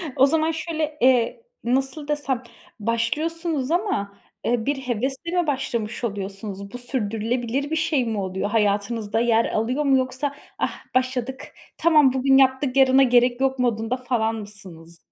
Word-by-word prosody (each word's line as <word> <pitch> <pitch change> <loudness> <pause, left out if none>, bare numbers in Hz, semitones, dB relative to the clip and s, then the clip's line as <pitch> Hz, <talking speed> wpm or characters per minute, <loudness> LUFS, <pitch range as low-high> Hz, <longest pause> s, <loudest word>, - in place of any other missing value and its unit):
O 265 - +6
zaman 315 +2 +2
şöyle, 315 -2 -3
eee, 255 - +3 0.2
nasıl 270 +4 -1
desem, 280 -4 -1 0.4
başlıyorsunuz 295 - -1
ama, 335 - -1 0.3
eee, 235 -1 +1
bir 285 - +1
hevesle 270 +8 -1
mi 340 - -5
başlamış 245 -5 -2
oluyorsunuz? 200 -1 -5
Bu, - - -4
sürdürülebilir 245 +3 -2
bir - - +1
şey 315 -5 +1
mi 225 -2 -2
oluyor? 190 +1 -2
Hayatınızda 210 +1 0
yer 230 -1 +3
alıyor 250 +7 0
mu, 270 -1 +5
yoksa, 260 +2 -2 0.2
"Ah - - -1 0.2
başladık, 255 0 -1 0.2
tamam 300 -5 +5
bugün 270 +1 +4
yaptık 260 0 +3
yarına 265 0 +6
gerek 245 0 +3
yok." 265 -1 +1
modunda 235 0 0
falan 240 -3 0
mısınız? 185 -6 -7
255 Hz, 145 wpm, -23 LUFS, 225-275 Hz, 0.4 s, O